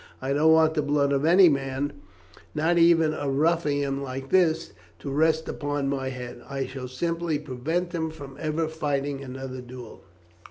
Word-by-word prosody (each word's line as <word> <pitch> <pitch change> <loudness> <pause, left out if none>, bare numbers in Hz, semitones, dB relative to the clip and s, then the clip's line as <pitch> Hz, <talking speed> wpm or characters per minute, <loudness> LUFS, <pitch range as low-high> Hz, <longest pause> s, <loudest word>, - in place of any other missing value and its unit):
I 135 +1 -2
don't 155 +3 +4
want 160 0 +5
the 155 - +1
blood 145 -1 +1
of 140 +2 +1
any 180 +3 +7
man 135 -1 -1 0.6
not 165 +3 +2
even 165 -2 +5
of 145 -2 -3
a - - 0
ruffian 145 -2 +1
like 135 0 -6
this 165 -3 +2 0.3
to 140 - -6
rest 160 +2 +2
upon 145 -1 -2
my 135 -1 -2
head. 125 -2 -7
I 135 -1 -2
shall 130 -1 -7
simply 165 +4 -2
prevent 155 +6 -3
him 160 -2 -1
from 145 -4 -10
ever 155 +1 -1
fighting 145 -3 -2
another 130 -1 -7
duel." 125 -2 -11
145 Hz, 170 wpm, -26 LUFS, 135-160 Hz, 0.6 s, any